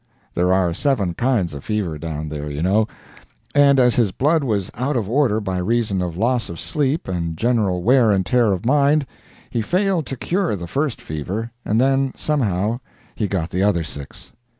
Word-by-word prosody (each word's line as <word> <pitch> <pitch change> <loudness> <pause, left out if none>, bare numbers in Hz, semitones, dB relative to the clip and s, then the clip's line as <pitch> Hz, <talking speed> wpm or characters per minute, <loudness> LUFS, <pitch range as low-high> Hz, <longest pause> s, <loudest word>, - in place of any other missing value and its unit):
There 90 +1 +1
are 95 -2 +2
seven 105 - 0
kinds 110 - 0
of 70 - -8
fever 100 -8 -2
down 80 -1 -4
there, 75 -1 -5
you 75 +2 -3
know; 105 +4 +3 0.7
and, 140 -1 +5
as 125 -2 +4
his 115 -6 +3
blood 150 - +2
was 105 -7 -1
out 130 +4 -1
of 110 -5 -2
order 120 -2 +2
by 95 -3 -3
reason 105 0 0
of 90 -2 -3
loss 120 +2 +1
of 85 - -7
sleep 150 +1 -1
and 85 -3 -3
general 105 -5 +1
wear 125 0 +5
and 95 -3 +2
tear 120 -4 +3
of 95 +1 -2
mind, 145 +2 +3 0.5
he 115 - 0
failed 180 - 0
to 135 - -5
cure 180 - 0
the 85 -3 -6
first 135 - -2
fever, 95 +10 -4
and 110 - +1
then 135 +1 +2
somehow 115 -6 0 0.3
he 105 - -2
got 90 -4 -2
the 90 - -1
other 95 -4 +2
six. 70 -3 -9
110 Hz, 190 wpm, -21 LUFS, 90-130 Hz, 0.7 s, and